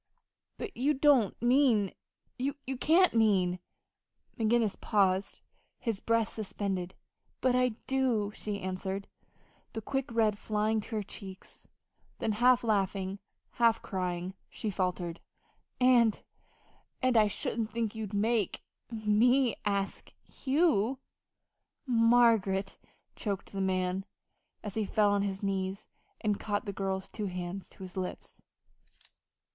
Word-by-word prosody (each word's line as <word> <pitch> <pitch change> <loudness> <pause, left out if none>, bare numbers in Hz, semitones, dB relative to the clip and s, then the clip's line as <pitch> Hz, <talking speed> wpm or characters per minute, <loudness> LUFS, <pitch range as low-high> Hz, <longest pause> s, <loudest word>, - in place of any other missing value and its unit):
"But 415 -4 -6
you 285 +5 +2
don't 265 -7 +4
mean 240 -6 +4 0.5
you 270 +2 -1 0.2
can't 350 +6 +5
mean 190 -6 +3 0.4
" - - -36
McGinnis 225 -1 +1
paused, 195 -2 +1 0.4
his 225 -5 -2
breath 230 -1 +1
suspended. 195 -3 -4 0.4
"But 255 -1 +2
I 250 -2 +2
do," 250 -6 +1
she 205 -2 -4
answered, 190 +1 -3 0.7
the 225 - -4
quick 270 +1 -2
red 220 -3 +2
flying 215 +1 0
to 220 - -7
her 210 - -1
cheeks. 195 -1 -10 0.5
Then, 220 - 0
half 245 +3 +4
laughing, 195 -3 0 0.3
half 230 -2 +3
crying, 180 -1 -3 0.2
she 215 - -4
faltered: 180 -2 -2 0.6
"And 245 -4 +4 0.8
and 255 -1 +3
I 215 -2 +6
shouldn't 220 +2 -2
think 230 -1 -2
you'd 220 -3 -5
make 215 -1 +1 0.3
me 230 +3 +3
ask 200 -1 -2 0.3
you!" 270 - +2 0.9
"Margaret!" 230 -5 +3 0.4
choked 200 -3 -4
the 195 - -3
man, 185 0 0 0.6
as 210 - -5
he 220 - 0
fell 205 0 +2
on 200 0 +2
his 195 0 -3
knees 195 0 -2 0.4
and 210 -2 0
caught 205 -1 -2
the 200 - -4
girl's 190 -1 -2
two 210 -2 -4
hands 180 +1 -5
to - - -12
his 185 -1 -9
lips. 185 -1 -6
210 Hz, 125 wpm, -31 LUFS, 195-235 Hz, 0.9 s, I